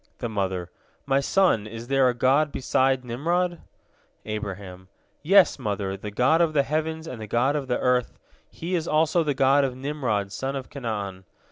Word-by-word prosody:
The 120 - -3
mother: 95 -4 -2 0.3
"My 135 0 +2
son, 140 - +2
is 115 +2 -8
there 135 -1 +3
a 120 - -2
God 140 +5 +2
beside 130 0 +1
Nimrod?" 170 +8 -1 0.6
Abraham: 95 -3 -6 0.3
"Yes, 190 +4 +5
mother, 100 -2 -2
the 105 +2 -7
God 125 +10 +3
of 165 -2 +2
the 140 -2 +3
heavens 160 +2 -2
and 125 -8 -7
the 110 - -6
God 125 +7 +1
of 140 -3 -2
the 125 - 0
earth, 125 -1 0 0.3
He 170 +3 -6
is 170 -2 0
also 160 +2 +2
the 145 -3 -1
God 135 +2 +4
of 130 -2 -1
Nimrod 130 -8 -2
son 135 +7 -3
of 135 -2 -6
Canaan. 100 -8 -5
130 Hz, 175 wpm, -25 LUFS, 105-150 Hz, 0.6 s, Yes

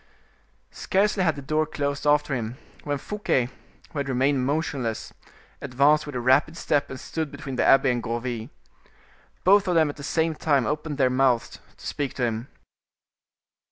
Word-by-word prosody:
Scarcely 200 +1 +1
had 160 -4 +2
the 140 - -8
door 155 +2 0
closed 140 -1 -2
after 145 -1 +3
him 120 -1 -3 0.3
when 145 -1 -1
Fouquet, 135 -8 -1 0.4
who 150 - -4
had 140 -1 -2
remained 130 0 +1
motionless, 140 -6 -2 0.5
advanced 140 +3 +3
with 145 - -7
a - - -1
rapid 135 +6 +3
step 145 -3 0
and 130 - -7
stood 160 +2 -4
between 140 -2 -7
the - - +1
abbe 135 -1 +5
and 120 -1 -1
Gourville. 120 0 -4 0.9
Both 195 +1 +5
of 180 - +1
them 160 -2 +4
at - - -18
the - - -9
same 160 +3 0
time 145 -5 +1
opened 150 -1 -3
their 130 -3 +3
mouths 130 -2 +1 0.2
to - - -14
speak 140 -2 -3
to 125 - -2
him. 115 +2 -3
140 Hz, 170 wpm, -25 LUFS, 130-155 Hz, 0.9 s, abbe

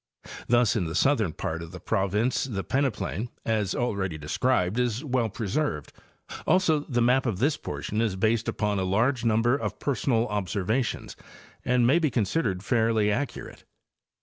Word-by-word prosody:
Thus 120 -2 +3
in 100 -6 0
the 80 - -4
southern 115 - +2
part 85 -3 -4
of 85 0 -8
the 90 - -8
province 105 +7 0
the 100 -7 -4
peneplain, 125 -4 -1 0.2
as 105 -4 0
already 100 -8 -1
described, 90 +6 0
is 125 +1 0
well 125 -4 0
preserved; 115 - -2 0.5
also 180 -5 +3
the 125 -5 -1
map 125 +2 +3
of 105 -6 -1
this 140 +8 +2
portion 105 - -4
is 110 -5 0
based 110 +4 +1
upon 105 -2 -1
a - - 0
large 115 +7 +1
number 115 +2 +3
of 105 -6 -3
personal 120 -3 0
observations 105 +4 -2 0.5
and 125 -1 +2
may 140 +8 +4
be 155 -3 +1
considered 105 - -1
fairly 110 -2 +2
accurate. 140 +6 -4
115 Hz, 155 wpm, -26 LUFS, 100-125 Hz, 0.5 s, may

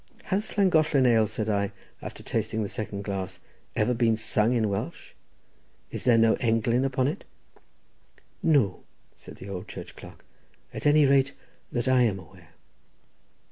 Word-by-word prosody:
"Has 210 +3 -2
Llangollen 155 -8 +4
ale," 115 -3 +4
said 110 0 -3
I, 100 -1 0 0.3
after - - -8
tasting 110 0 -2
the - - -2
second 100 -1 -5
glass, 95 -2 -4 0.4
"ever 110 +3 +2
been 115 -2 +2
sung 110 0 +1
in 115 -3 +2
Welsh? 100 -1 -4 0.8
is - - -4
there 120 -2 +5
no 115 0 +5
englyn 115 +2 +1
upon 130 -1 +1
it?" 145 - -3 1.2
"No," 135 - +2 0.3
said - - -12
the 95 - -11
old 95 -2 -6
church - - -9
clerk, - - -13 0.5
"at - - -2
any 150 0 +6
rate, 135 0 +3 0.4
that 120 0 -2
I 130 -1 +4
am 110 -5 +2
aware." 90 -4 -15
115 Hz, 150 wpm, -27 LUFS, 105-130 Hz, 1.2 s, any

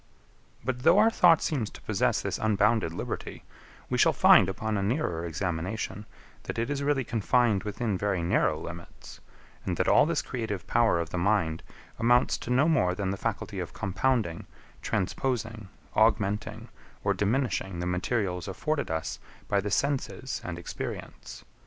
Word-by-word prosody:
But 130 -1 -1
though 165 +7 +5
our 220 +2 +6
thought 170 -6 +5
seems 130 -9 -1
to - - -13
possess - - +1
this - - -2
unbounded 105 -3 +2
liberty, 85 - -5 0.4
we - - -1
shall - - +5
find, 95 - +6
upon 110 +3 -2
a 100 - 0
nearer 95 - -1
examination, 95 +5 -3 0.4
that - - -5
it 115 +4 -1
is 145 -1 -2
really 140 -1 +1
confined 115 -2 +2
within 105 -2 -2
very 100 -4 0
narrow 85 -3 +2
limits, 85 0 -10 0.4
and - - -2
that - - +1
all - - +5
this 165 -2 0
creative 110 -7 -4
power 115 -7 +3
of 85 -2 -3
the 90 - -2
mind 85 -4 +1 0.4
amounts 120 +2 +3
to - - -8
no 130 +5 +3
more 105 - +2
than 95 -1 -2
the - - -2
faculty - - -3
of - - -5
compounding, 100 -2 -1 0.3
transposing, 110 0 -2 0.2
augmenting, 105 -1 +1 0.3
or - - +2
diminishing 105 -5 -1
the 90 - -2
materials 90 0 -1
afforded 150 +10 -2
us 80 0 -3 0.3
by 100 -1 +2
the 100 - -3
senses 130 +2 -1
and 85 -1 -5
experience. 85 - -7
105 Hz, 160 wpm, -28 LUFS, 90-125 Hz, 0.4 s, our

